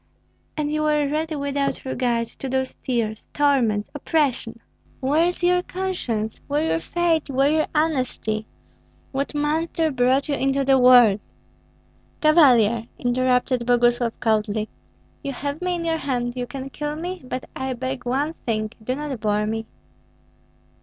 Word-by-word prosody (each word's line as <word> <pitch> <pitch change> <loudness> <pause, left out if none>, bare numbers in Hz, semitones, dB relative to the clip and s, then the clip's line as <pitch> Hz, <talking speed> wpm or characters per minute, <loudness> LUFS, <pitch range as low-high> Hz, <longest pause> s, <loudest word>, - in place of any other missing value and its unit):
And 295 -1 -1
you 305 - 0
were 300 -1 +2
ready 310 +2 -2
without 280 -1 -2
regard 240 -3 0
to 270 - -4
those 260 0 -1
tears, 225 -4 -2
torments, 245 -8 +2
oppression. 275 -6 -1 0.4
Where 300 +6 +2
is 355 0 -4
your 360 0 +4
conscience, 345 - -3
where 290 +2 0
your 325 - +1
faith, 330 -3 0
where 275 +2 +2
your 310 0 +2
honesty? 255 -8 0 0.6
What 275 +2 -3
monster 315 +2 0
brought 260 +1 +2
you 295 - -1
into 275 0 +1
the 270 0 +5
world?" 245 -5 +7 1.0
"Cavalier," 240 -8 +5
interrupted 250 0 +1
Boguslav, 240 -1 +2
coldly, 215 -2 0 0.5
"you 275 - -4
have 285 +4 -4
me 360 0 0
in 335 -1 -4
your 325 -1 +1
hand, 245 -5 -2
you 250 -1 -3
can 265 +2 -6
kill 295 +1 -4
me; 355 +3 -5
but 255 0 -5
I 265 0 -2
beg 260 0 -4
one 275 +6 -1
thing, 215 -2 -1
do 255 +3 -1
not 290 -4 -4
bore 210 0 +1
me." 225 +1 -3
265 Hz, 145 wpm, -23 LUFS, 240-300 Hz, 1.0 s, world